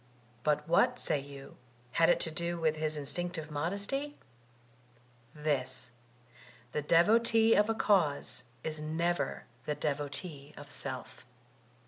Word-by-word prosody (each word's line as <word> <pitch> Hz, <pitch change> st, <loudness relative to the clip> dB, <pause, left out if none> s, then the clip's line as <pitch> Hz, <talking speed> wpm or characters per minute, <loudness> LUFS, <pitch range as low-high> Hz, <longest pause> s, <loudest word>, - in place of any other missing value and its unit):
But 150 Hz, +2 st, +1 dB
what, 245 Hz, +9 st, +4 dB
say 145 Hz, -, 0 dB
you, 140 Hz, 0 st, -10 dB, 0.3 s
had 165 Hz, +4 st, +4 dB
it -, -, +4 dB
to 160 Hz, -, +2 dB
do 170 Hz, +1 st, -2 dB
with 160 Hz, -2 st, +2 dB
his 155 Hz, 0 st, -1 dB
instinctive 155 Hz, +2 st, -3 dB
modesty? 200 Hz, -, -2 dB, 1.2 s
This: 135 Hz, -5 st, -1 dB, 0.8 s
the 150 Hz, -, -1 dB
devotee 225 Hz, +8 st, +5 dB
of 210 Hz, +1 st, +4 dB
a 225 Hz, -, +2 dB
cause 155 Hz, -, +2 dB, 0.2 s
is 155 Hz, -1 st, -4 dB
never 165 Hz, +3 st, -1 dB, 0.2 s
the 150 Hz, -, 0 dB
devotee 145 Hz, 0 st, -3 dB
of 145 Hz, 0 st, -10 dB
self. 130 Hz, -2 st, -6 dB
155 Hz, 120 wpm, -32 LUFS, 145-175 Hz, 1.2 s, devotee